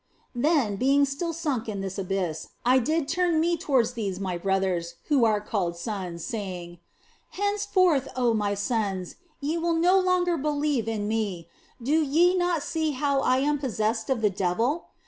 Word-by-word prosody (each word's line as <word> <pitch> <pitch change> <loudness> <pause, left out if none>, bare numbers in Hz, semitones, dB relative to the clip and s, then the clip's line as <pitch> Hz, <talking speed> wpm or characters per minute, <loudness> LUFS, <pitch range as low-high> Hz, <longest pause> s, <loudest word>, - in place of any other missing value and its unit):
Then, 250 -5 +1
being 275 +5 +4
still 280 +5 -3
sunk 290 -9 -2
in 200 -2 -3
this 195 0 -4
abyss, 185 -4 -2 0.2
I 255 +2 +5
did 310 +4 0
turn 350 -1 +1
me 340 +2 +2
towards 260 -7 +1
these 200 -6 -3
my 190 -2 -2
brothers 185 -2 -1
(who 275 -6 +4
are 215 -2 +3
called 190 -5 -2
sons), 180 -3 -5
saying: 180 -6 -5 0.3
" - - -35
Henceforth, 370 -8 +2
oh 245 -2 +2
my 205 -2 0
sons, 200 -4 -2 0.2
ye 310 +4 -1
will 335 0 +1
no 355 +4 +4
longer 365 -2 +2
believe 290 -5 0
in 215 -2 -2
me; 205 -6 -2 0.3
do 290 +7 +2
ye 330 +5 +3
not 350 -4 +1
see 315 -2 -1
how 280 +1 0
that - - -1
I 255 - +4
am 290 +1 +1
possessed 225 -3 -1
of 260 -4 0
the 210 -2 +3
devil 225 - 0
245 Hz, 175 wpm, -26 LUFS, 200-310 Hz, 0.3 s, I